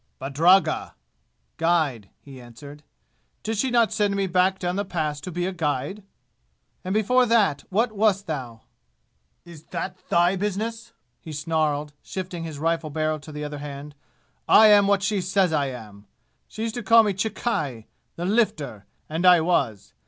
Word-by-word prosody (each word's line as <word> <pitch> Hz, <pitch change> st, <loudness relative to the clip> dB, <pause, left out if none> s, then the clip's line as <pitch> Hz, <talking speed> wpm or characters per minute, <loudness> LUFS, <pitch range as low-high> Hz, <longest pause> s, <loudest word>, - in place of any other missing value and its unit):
"Badragga" 165 Hz, +8 st, +2 dB, 0.6 s
(guide), 155 Hz, -, 0 dB
he 135 Hz, -3 st, -12 dB
answered. 140 Hz, +5 st, -12 dB, 0.6 s
"Did 225 Hz, +1 st, -2 dB
she 260 Hz, +5 st, 0 dB
not 235 Hz, -2 st, +2 dB
send 205 Hz, -2 st, +1 dB
me 200 Hz, 0 st, 0 dB
back 185 Hz, +1 st, +2 dB
down 180 Hz, -1 st, -2 dB
the 200 Hz, -, -1 dB
Pass 155 Hz, -6 st, -3 dB
to 185 Hz, -, -7 dB
be 175 Hz, +1 st, -2 dB
a 190 Hz, -, -2 dB
guide?" 160 Hz, +2 st, -3 dB, 0.8 s
"And 185 Hz, -, -4 dB
before 245 Hz, +5 st, +3 dB
that 215 Hz, -11 st, +2 dB
what 220 Hz, +5 st, +1 dB
wast 205 Hz, -2 st, +1 dB
thou?" 125 Hz, -8 st, -6 dB, 0.8 s
"Is 165 Hz, -3 st, -13 dB
that 180 Hz, +1 st, -5 dB
thy 175 Hz, +2 st, +3 dB
business?" 220 Hz, +4 st, -4 dB, 0.3 s
he 160 Hz, -, -10 dB
snarled, 150 Hz, -1 st, -1 dB
shifting 180 Hz, -3 st, -6 dB
his 160 Hz, -3 st, -6 dB
rifle 165 Hz, +1 st, -1 dB
barrel 155 Hz, +1 st, -1 dB
to 155 Hz, -, -12 dB
the 150 Hz, 0 st, -6 dB
other 150 Hz, -1 st, -6 dB
hand. 145 Hz, 0 st, -8 dB, 0.5 s
"I 220 Hz, 0 st, +7 dB
am 205 Hz, -1 st, +6 dB
what 200 Hz, -1 st, +2 dB
she 205 Hz, -1 st, 0 dB
says 185 Hz, -1 st, +1 dB
I 145 Hz, -2 st, +1 dB
am! 105 Hz, -5 st, -10 dB, 0.4 s
She 220 Hz, -, -6 dB
used 225 Hz, -1 st, -2 dB
to 240 Hz, -, -4 dB
call 230 Hz, +2 st, +6 dB
me 205 Hz, -2 st, 0 dB
'Chikki' 180 Hz, -, -3 dB, 0.3 s
the 175 Hz, -, -4 dB
Lifter! 165 Hz, -, -1 dB, 0.2 s
and 160 Hz, +3 st, -3 dB
I 180 Hz, -1 st, +7 dB
was! 135 Hz, -, -1 dB
175 Hz, 165 wpm, -24 LUFS, 150-200 Hz, 0.8 s, I